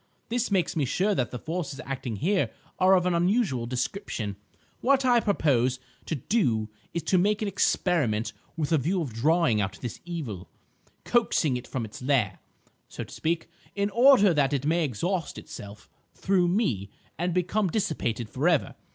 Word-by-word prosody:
This 245 +1 0
makes 190 -3 +1
me 155 - +1
sure 185 +11 +1
that 125 - 0
the 125 - -5
forces 155 -2 -4
acting 130 -4 -4
here 185 - +1 0.3
are 185 +1 +6
of 180 -1 +2
an 180 - +2
unusual 175 - +1
description. 120 - -3 0.4
What 270 +1 +3
I 245 -2 +5
propose 135 - +2 0.3
to 160 - -1
do 120 - 0 0.2
is 170 - -3
to 180 +3 +3
make 210 +3 +2
an - - -1
experiment 135 - +1 0.2
with 150 -2 -1
a 160 - +4
view 175 +6 0
of 130 -7 -6
drawing 150 -2 +2
out 95 +1 -3
this 120 - -5
evil, 135 - -6 0.6
coaxing 200 - +2
it 125 - -5
from 125 -4 -3
its 110 - -10
lair, 125 -7 +1 0.5
so - - -6
to - - -12
speak, 165 +1 -1 0.3
in 200 0 0
order 235 -4 +6
that 145 -2 +2
it 140 0 -1
may 165 +2 +2
exhaust 165 - -2
itself 100 0 -10 0.3
through 185 -2 +2
me 170 - 0 0.3
and 175 +1 0
become 185 +4 +1
dissipated 125 - -1
for 135 +9 +1
ever. 165 -6 +1
160 Hz, 170 wpm, -27 LUFS, 125-190 Hz, 0.6 s, are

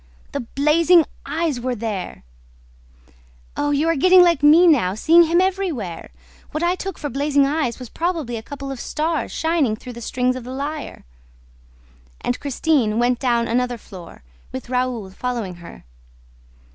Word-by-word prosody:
"The 280 - -3
blazing 305 +6 +3 0.2
eyes 300 -3 -1
were 250 0 -2
there!" 210 -5 -5 1.3
"Oh, 290 - -1
you 290 +2 +1
are 330 - +2
getting 365 +5 +6
like 340 -4 +3
me 310 +4 +7
now, 240 - +3
seeing 335 +9 +5
him 335 +2 +2
everywhere! 360 - -2 0.4
What 310 - -3
I 345 +1 +2
took 385 0 -5
for 290 - -4
blazing 280 +1 +1
eyes 280 -5 -1
was 250 -3 -9
probably 325 -8 -2
a 225 - -5
couple 275 +3 -7
of 265 - -6
stars 315 +4 -2
shining 320 -9 0
through 245 +3 -10
the 235 - -9
strings 255 +2 -1
of 255 - -6
the 245 - -9
lyre." 290 - -5 1.2
And 245 - -2
Christine 275 -5 0
went 240 +1 +1
down 235 -3 +1
another 245 +1 0
floor, 180 - -13 0.3
with 130 - -7
Raoul 250 -6 -2
following 220 -4 -4
her. 170 0 -12
275 Hz, 160 wpm, -21 LUFS, 235-320 Hz, 1.3 s, me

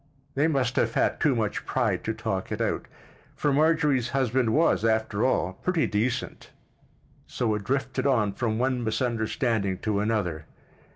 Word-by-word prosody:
They 145 +3 +2
must 130 -5 0
have - - +1
had - - +1
too 145 -4 +3
much 110 -3 -1
pride - - -1
to - - -1
talk - - -3
it - - -3
out—for 145 - -4
Marjorie's 150 -4 +2
husband 130 -2 +1
was, 160 -3 +3
after 110 -1 +1
all, 95 -8 +1
pretty 170 - 0
decent—so 110 +1 -4
it 105 -1 -3
drifted 135 +4 -1
on 110 -7 +2
from 110 0 -1
one 125 0 0
misunderstanding 110 -3 -1
to 105 -2 0
another. 100 -8 -1
120 Hz, 140 wpm, -26 LUFS, 110-135 Hz, -, too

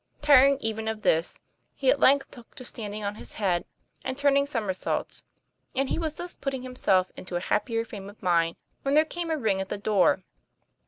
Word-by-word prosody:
Tiring 280 -1 +7
even 220 0 -2
of 220 -1 -3
this, 165 +2 +2 0.4
he 265 -2 +3
at 280 - +1
length 275 +1 +4
took 240 -3 -15
to 255 - -8
standing 210 -3 -5
on 200 0 -2
his - - -8
head 185 -5 0 0.4
and 260 - -3
turning 280 0 +3
somer 225 -9 -1
saults; 185 - -3 0.5
and 270 0 0
he - - -1
was 315 -2 -2
thus 350 +2 -6
putting 270 -2 -4
himself 200 -8 +1
into 180 -1 -7
a - - +1
hap 195 +6 0
pier 230 -1 -1
frame 200 -3 -8
of 205 - -15
mind, 170 -3 +2 0.3
when 275 +1 +1
there 310 +1 +6
came 340 +1 -4
a 320 - +1
ring 210 -7 +1
at 190 - -5
the - - -2
door. 200 -2 +2
225 Hz, 210 wpm, -27 LUFS, 200-275 Hz, 0.5 s, Tiring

